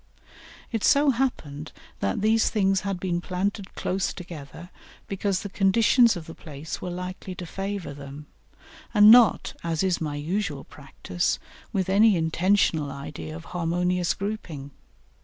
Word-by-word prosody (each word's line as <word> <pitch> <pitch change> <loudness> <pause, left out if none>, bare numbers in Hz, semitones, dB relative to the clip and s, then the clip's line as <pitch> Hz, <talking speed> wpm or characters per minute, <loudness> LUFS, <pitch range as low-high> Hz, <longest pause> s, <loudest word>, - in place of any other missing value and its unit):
It 225 -4 -2
so 285 0 +5
happened 160 - -3 0.3
that 100 - -1
these 220 +1 +3
things 195 -3 +2
had 195 -3 -3
been 175 -2 -1
planted 195 +2 -3
close 185 0 -1
together 170 -1 -10 0.4
because 195 -1 -1
the 200 - -5
conditions 220 +4 +4
of 165 - -8
the 165 - -9
place 155 -1 -8
were 180 - -4
likely 180 +1 -6
to 180 - -6
favour 195 -1 -4
them, 140 +1 -9 0.7
and 210 +1 +9
not, 235 -2 +6
as 165 0 -1
is 185 -3 +1
my 150 -2 -2
usual 155 -1 -2
practice, 135 -11 -3 0.3
with 190 -2 -1
any 205 +2 +5
intentional 160 -2 +1
idea 80 - -7
of 80 - -9
harmonious 180 +1 0
grouping. 175 -9 -5
180 Hz, 140 wpm, -25 LUFS, 155-200 Hz, 0.7 s, and